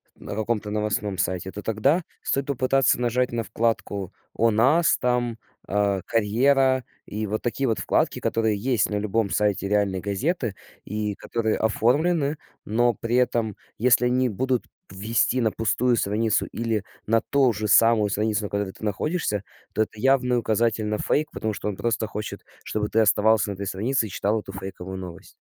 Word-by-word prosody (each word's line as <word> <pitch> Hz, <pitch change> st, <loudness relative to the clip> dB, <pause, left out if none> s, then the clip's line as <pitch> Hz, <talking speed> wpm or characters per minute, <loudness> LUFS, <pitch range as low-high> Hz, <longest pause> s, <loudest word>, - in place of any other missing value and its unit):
на -, -, -7 dB
каком-то 110 Hz, -1 st, -1 dB
новостном 105 Hz, -1 st, -1 dB
сайте, 95 Hz, +1 st, -2 dB
то 105 Hz, -, -7 dB
тогда 135 Hz, -, +2 dB, 0.2 s
стоит 140 Hz, 0 st, -1 dB
попытаться 135 Hz, -1 st, +2 dB
нажать 125 Hz, +1 st, +1 dB
на 120 Hz, -1 st, -1 dB
вкладку 105 Hz, -3 st, -2 dB, 0.2 s
"О 115 Hz, 0 st, +3 dB
нас", 135 Hz, +10 st, +4 dB
там, 120 Hz, -2 st, 0 dB, 0.3 s
а, 100 Hz, -1 st, +1 dB
"Карьера". 130 Hz, +4 st, +2 dB, 0.2 s
И 110 Hz, +1 st, -3 dB
вот 110 Hz, +2 st, -2 dB
такие 130 Hz, +3 st, -1 dB
вот 115 Hz, -, 0 dB
вкладки, -, -, +1 dB
которые 110 Hz, -2 st, +1 dB
есть 120 Hz, 0 st, +1 dB
на -, -, -1 dB
любом 105 Hz, 0 st, 0 dB
сайте 105 Hz, -2 st, +1 dB
реальной 100 Hz, -2 st, +1 dB
газеты 115 Hz, -, -1 dB, 0.3 s
и 105 Hz, 0 st, -3 dB
которые 110 Hz, 0 st, -1 dB
оформлены, 145 Hz, +7 st, +1 dB, 0.3 s
но 120 Hz, +3 st, +2 dB
при 115 Hz, +1 st, -3 dB
этом, 115 Hz, -4 st, +1 dB, 0.2 s
если 125 Hz, +1 st, +4 dB
они 125 Hz, +1 st, +2 dB
будут 125 Hz, +3 st, -1 dB, 0.3 s
вести 110 Hz, +6 st, 0 dB
на 110 Hz, -2 st, +2 dB
пустую 120 Hz, +3 st, +1 dB
страницу 110 Hz, 0 st, +1 dB
или 115 Hz, -3 st, -2 dB, 0.2 s
на 115 Hz, +1 st, +4 dB
то 135 Hz, -3 st, +2 dB
же 105 Hz, 0 st, -3 dB
самую 110 Hz, 0 st, +5 dB
страницу, 105 Hz, +1 st, 0 dB
на 105 Hz, -, -3 dB
которой 100 Hz, -1 st, -1 dB
ты -, -, -15 dB
находишься, 105 Hz, -, -1 dB, 0.3 s
то -, -, +1 dB
это 105 Hz, -, -10 dB
явный 125 Hz, 0 st, +3 dB
указатель 115 Hz, -1 st, +1 dB
на 105 Hz, 0 st, -1 dB
фейк, 155 Hz, +1 st, 0 dB
потому 110 Hz, -1 st, -3 dB
что 105 Hz, -, -5 dB
он 100 Hz, -, -4 dB
просто 115 Hz, +1 st, -1 dB
хочет, 105 Hz, 0 st, -6 dB, 0.2 s
чтобы 105 Hz, -1 st, -2 dB
ты 110 Hz, -, +2 dB
оставался 110 Hz, 0 st, +3 dB
на -, -, -2 dB
этой 100 Hz, -, -5 dB
странице 110 Hz, +5 st, 0 dB
и -, -, -10 dB
читал 105 Hz, +4 st, 0 dB
эту 100 Hz, -, -9 dB
фейковую 95 Hz, -1 st, -7 dB
новость. 90 Hz, -2 st, -9 dB
110 Hz, 170 wpm, -24 LUFS, 105-125 Hz, 0.3 s, самую